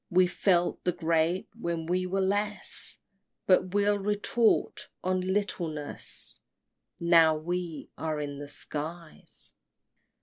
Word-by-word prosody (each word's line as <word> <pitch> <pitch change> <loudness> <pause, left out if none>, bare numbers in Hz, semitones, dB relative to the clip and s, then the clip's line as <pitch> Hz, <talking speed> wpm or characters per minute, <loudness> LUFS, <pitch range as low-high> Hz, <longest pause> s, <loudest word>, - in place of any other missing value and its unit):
We 185 +1 +5
felt 175 -1 +1
the 180 - +1
great 165 +2 +1
when 170 -7 -3
we 180 +2 0
were 195 +1 0
less, 205 +1 -1 0.5
But 185 0 +3
we'll 205 0 +3
retort 210 +3 +1
on 185 0 +1
littleness 180 -6 -3 0.6
Now 165 -2 +6
we 175 0 -4
are 155 -2 -1
in 145 -1 -4
the 145 0 -7
skies. 155 - -5
175 Hz, 110 wpm, -29 LUFS, 160-190 Hz, 0.6 s, Now